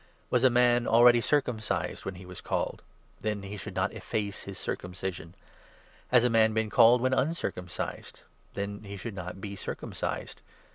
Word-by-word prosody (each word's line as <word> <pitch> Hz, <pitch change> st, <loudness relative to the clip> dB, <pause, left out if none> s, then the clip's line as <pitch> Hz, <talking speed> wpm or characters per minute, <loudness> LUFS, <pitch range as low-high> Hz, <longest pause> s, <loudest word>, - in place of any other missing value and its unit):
Was 125 Hz, 0 st, +3 dB
it -, -, +8 dB
a -, -, +4 dB
man 120 Hz, 0 st, +3 dB
already 120 Hz, +1 st, +6 dB
circumcised 125 Hz, -6 st, -1 dB
when 95 Hz, -, -4 dB
he 90 Hz, +1 st, -11 dB
was 90 Hz, 0 st, -9 dB
called? -, -, -2 dB, 0.4 s
Then 105 Hz, -2 st, -2 dB
he 100 Hz, +1 st, -6 dB
should 100 Hz, -1 st, -7 dB
not 95 Hz, +2 st, 0 dB
efface 100 Hz, -3 st, -4 dB
his 100 Hz, -1 st, -7 dB
circumcision. 90 Hz, -1 st, -5 dB, 0.7 s
Has 125 Hz, -1 st, +5 dB
a -, -, +4 dB
man 110 Hz, -1 st, +4 dB
been 110 Hz, -1 st, 0 dB
called 120 Hz, +2 st, +6 dB
when 130 Hz, +1 st, +2 dB
uncircumcised? 130 Hz, -, -3 dB, 0.3 s
Then 100 Hz, +1 st, -4 dB
he 100 Hz, -1 st, -7 dB
should 105 Hz, +3 st, -6 dB
not 90 Hz, -1 st, -6 dB
be 100 Hz, 0 st, -6 dB
circumcised. 95 Hz, -, -5 dB
105 Hz, 170 wpm, -29 LUFS, 95-120 Hz, 0.7 s, it